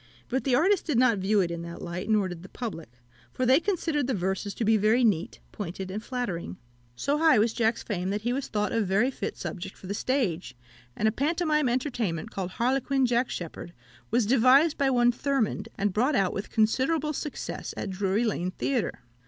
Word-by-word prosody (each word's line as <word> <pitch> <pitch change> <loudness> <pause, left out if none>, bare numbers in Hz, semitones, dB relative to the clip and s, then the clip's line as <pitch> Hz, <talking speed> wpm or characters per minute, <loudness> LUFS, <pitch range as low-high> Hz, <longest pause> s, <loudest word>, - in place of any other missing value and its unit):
But 260 +2 -1
the 260 -3 +3
artist 370 +6 +2
did 295 -7 +1
not 235 -4 +4
view 200 +2 +2
it 170 -2 -1
in 170 0 -4
that 170 0 -7
light, 180 +4 -5
nor 210 -3 +3
did 175 -2 -7
the 185 - -12
public; 215 - -6 0.4
for 255 - -1
they 260 +4 +6
considered 325 -7 -1
the 265 - 0
verses 190 +2 -2
to 230 - -1
be 220 +1 +4
very 215 +4 +3
neat, 190 -7 +1
pointed, 190 -1 -5
and 210 +3 -4
flattering. 200 - -4 0.4
So 285 - 0
high 320 -5 +5
was 220 +2 +3
Jack's 225 -1 +1
fame, 185 -4 -2
that 205 +1 -1
he 240 +1 0
was 275 +1 -2
thought 210 -1 -1
a 230 - +1
very 210 +6 +2
fit - - -5
subject 190 0 -6
for - - -13
the 195 - -3
stage; 195 - -1 0.4
and 220 - +1
a - - +3
pantomime 305 +1 +1
entertainment, 235 - -2
called 185 -2 -3
"Harlequin 265 +2 +1
Jack 240 +1 +1
Sheppard," 170 0 -6 0.4
was 235 0 +2
devised 265 +7 +5
by 275 -1 +2
one 245 -2 +4
Thurmond, 240 -5 -1
and 200 -1 0
brought 255 +8 +2
out 195 -4 +2
with 195 - -5
considerable 270 +8 +1
success 295 +1 -5
at 200 - -3
Drury 195 +3 0
Lane 185 -6 -1
Theatre. 240 +5 -2
225 Hz, 200 wpm, -27 LUFS, 190-265 Hz, 0.4 s, they